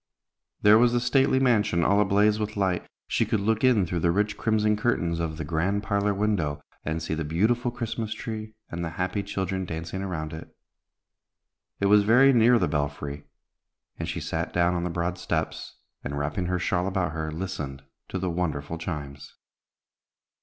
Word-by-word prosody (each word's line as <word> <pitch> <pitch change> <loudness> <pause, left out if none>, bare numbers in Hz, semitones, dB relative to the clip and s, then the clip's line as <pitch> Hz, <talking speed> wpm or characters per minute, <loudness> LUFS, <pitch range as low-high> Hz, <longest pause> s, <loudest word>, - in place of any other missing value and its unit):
There 105 +1 +7
was 120 0 +4
the 120 - +3
stately 130 +2 +3
mansion 105 -9 +2
all 100 +4 +4
ablaze 105 +2 +3
with 105 0 -3
light. 95 -3 0 0.2
She - - +1
could 110 - 0
look 110 +3 0
in 120 -7 +4
through 85 0 -2
the 85 - +2
rich 105 +4 +1
crimson 105 -1 +2
curtains 90 -7 0
of 80 -2 -3
the 80 - -3
grand 90 +6 0
parlor 100 +1 +1
window, 95 -8 0 0.2
and 80 +1 -2
see 80 - -2
the 80 0 -2
beautiful 110 +11 +1
Christmas 115 -2 -4
tree, 110 -1 -6 0.2
and 85 0 -3
the 85 - -2
happy 95 +3 -1
children 95 -1 -2
dancing 85 +2 -5
around 80 -5 -4
it. 80 - -10 1.2
It 100 - +1
was 105 +1 +6
very 125 +6 +6
near 120 +1 +6
the - - +1
belfry, 75 -1 -3 0.7
and 80 -1 -3
she 85 +2 -3
sat 80 +1 -3
down 85 0 +2
on 85 -1 -1
the 90 - -1
broad 85 +1 -2
steps, - - -3 0.3
and, 70 +1 -4
wrapping 75 +5 -2
her 90 0 0
shawl 90 0 0
about 95 -4 0
her, 80 -1 -3
listened 75 -5 -5 0.3
to - - -3
the 95 -1 -1
wonderful 80 -2 -2
chimes. 70 -5 -6
90 Hz, 180 wpm, -26 LUFS, 80-105 Hz, 1.2 s, There